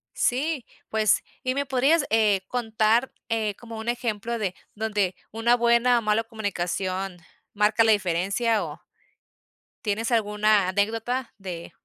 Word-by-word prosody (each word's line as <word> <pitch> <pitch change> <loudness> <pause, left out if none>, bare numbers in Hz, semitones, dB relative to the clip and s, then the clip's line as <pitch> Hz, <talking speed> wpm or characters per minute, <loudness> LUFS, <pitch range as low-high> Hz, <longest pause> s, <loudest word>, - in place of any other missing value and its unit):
Sí, 275 +1 0 0.2
pues, 215 -2 +3 0.2
¿y 255 0 0
me 280 +1 -1
podrías, 275 +4 +3
eh, 210 -3 +3
contar, 225 0 +1 0.2
eh, 215 -3 0
como 230 -1 -9
un 220 +2 -4
ejemplo 235 -1 -2
de 190 -3 -2 0.2
donde 210 -4 0 0.2
una 230 +2 +3
buena 235 +1 +4
o - - -5
mala 215 +1 +1
comunicación 190 -3 -3 0.4
marca 215 +2 +3
la 225 - +5
diferencia 200 +3 +1
o? 155 0 -7 1.1
¿tienes 220 +3 -1
alguna 210 -3 +3
anécdota 225 +6 -1
de 180 -4 -7
220 Hz, 130 wpm, -25 LUFS, 200-235 Hz, 1.1 s, la